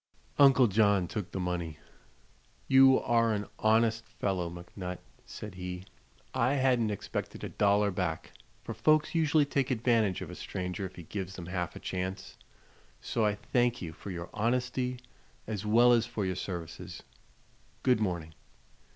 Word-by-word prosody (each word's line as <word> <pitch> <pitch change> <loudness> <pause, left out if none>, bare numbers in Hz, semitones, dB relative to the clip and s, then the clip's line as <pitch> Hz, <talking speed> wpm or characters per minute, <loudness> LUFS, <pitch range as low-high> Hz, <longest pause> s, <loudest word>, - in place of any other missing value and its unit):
Uncle 135 -2 +7
John 100 -3 +3
took 100 0 -4
the 95 - -5
money. 85 -4 -3 0.9
"You 135 0 +7
are 115 -1 +2
an 105 -1 -2
honest 110 +1 +3
fellow, 90 -4 -2
McNutt," 90 +1 -7 0.3
said 105 -2 -8
he. 90 0 -6 0.5
"I 130 +2 +2
hadn't 125 -4 +2
expected 105 - -5
a - - -3
dollar 100 0 +2
back, 90 -3 -3 0.3
for - - -5
folks 155 0 +3
usually 155 -2 +3
take 140 -2 0
advantage 115 -6 +2
of - - -6
a - - -7
stranger 90 +1 -4
if 95 - -16
he 85 - -9
gives 95 +2 -5
them 90 - -7
half 90 -1 -3
a - - -7
chance. 95 +1 -4 0.6
So 115 - -1
I 105 - 0
thank 120 +3 0
you 80 -3 -6
for 80 +5 -9
your 85 -2 -6
honesty 125 +3 0 0.5
as 105 -1 -4
well 120 +3 +6
as 115 -1 +2
for 105 - -3
your 95 -1 -1
services. 85 -3 -6 0.8
Good 125 -3 +4
morning." 85 -6 -2
105 Hz, 155 wpm, -30 LUFS, 90-120 Hz, 0.9 s, Uncle